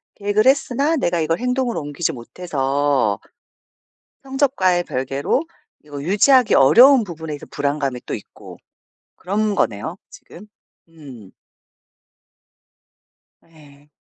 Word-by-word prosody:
계획을 205 +2 0
했으나 280 +3 +2
내가 175 - 0
이걸 165 +2 -1
행동으로 250 -1 -1
옮기지 145 +3 -3
못해서 135 - -1 1.0
성적과의 265 -10 +1
별개로 135 - -2 0.4
이거 145 -2 -8
유지하기 215 - +3
어려운 245 - +6
부분에 160 -5 -7
이제 - - -11
불안감이 140 -3 -3
또 - - -5
있고 - - -10 0.6
그런 205 +2 -2
거네요 115 - -2
지금. 200 +5 -14 0.4
음. 135 - -14 2.1
예. 150 -3 -21
165 Hz, 245 characters per minute, -20 LUFS, 140-215 Hz, 2.1 s, 어려운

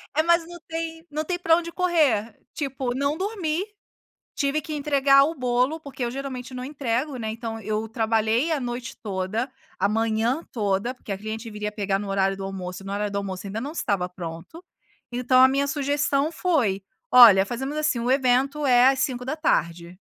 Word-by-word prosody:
É, 310 - +4
mas 340 0 +3
não 345 0 -10
tem 325 0 -5
não 305 +1 -2
tem 355 +2 -3
pra 330 -2 +4
onde 335 0 -3
correr, 290 - +1 0.2
tipo 265 -3 -3
não 280 +3 0
dormi, 380 -3 -2 0.7
tive 285 +1 0
que 305 +1 -6
entregar 280 -2 +4
o 320 +3 -1
bolo, 255 +3 0
porque 270 -4 -5
eu 235 - -2
geralmente 260 -1 -6
não 250 0 -5
entrego, 270 0 -2
né, 220 -2 -3
então 225 0 -5
eu 215 +1 -2
trabalhei 225 +5 +1
a 305 - +1
noite 245 0 -5
toda, 205 +5 -2 0.3
a 200 - +2
manhã 225 +6 0
toda, 210 +2 -1
porque 215 -5 -7
a 195 - -4
cliente 220 +2 -6
viria 210 0 -4
pegar 200 -2 -1
no 205 - -5
horário 195 0 +1
do 195 - -6
almoço 185 -1 -6
e - - -12
no 195 - -4
horário 205 0 -2
do 200 - -1
almoço 195 -1 -5
ainda 210 +3 -4
não 280 +5 -5
estava 200 - -1
pronto, 180 - -9 0.5
então 250 +1 +3
a 260 - +8
minha 280 +1 +1
sugestão 285 +1 0
foi: 260 - +1 0.3
"Olha 225 -6 +9
fazemos 265 +6 -4
assim 305 -5 +1
o 240 +2 -1
evento 270 +2 +2
é 250 0 +6
às 270 -1 +2
17h. 245 - -1
250 Hz, 190 wpm, -24 LUFS, 210-290 Hz, 0.7 s, Olha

